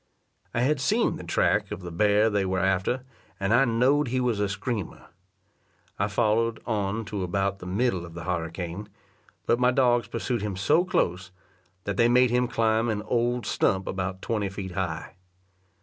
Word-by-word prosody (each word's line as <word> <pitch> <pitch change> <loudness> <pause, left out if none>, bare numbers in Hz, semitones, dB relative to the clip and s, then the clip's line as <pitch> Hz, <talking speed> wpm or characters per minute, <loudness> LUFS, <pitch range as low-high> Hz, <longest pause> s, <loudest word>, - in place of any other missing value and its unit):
I 120 - -1
had 140 +3 +2
seen 220 +11 +1
the - - -8
track 85 - +1
of 90 - -5
the 90 - -6
bear 105 +5 +3
they 100 -1 +1
were 95 0 -1
after, 95 +7 0 0.4
and 100 +2 +1
I 130 +3 +5
knowed 130 +5 +2
he 130 +2 0
was 120 -4 0
a 105 -1 0
screamer. 100 0 -4 0.9
I 100 - +2
followed 110 +1 +1
on 110 -1 -1
to 105 -1 -4
about 95 +2 -1
the 90 - -8
middle 95 -1 0
of 85 -1 -10
the 85 - -6
harricane; 85 +3 -4 0.6
but 120 - +2
my 125 0 +4
dogs 125 -2 +2
pursued 120 -4 -2
him 105 -2 -3
so 150 - +3
close, 90 - -1 0.5
that 100 -1 -3
they 115 0 +4
made 125 0 +4
him 125 0 +2
climb 115 0 +1
an 105 -1 -2
old 120 +1 0
stump 95 -2 +1
about 95 0 -4
twenty 105 -4 -1
feet 95 -1 -6
high. 90 -2 -4
105 Hz, 180 wpm, -26 LUFS, 95-120 Hz, 0.9 s, I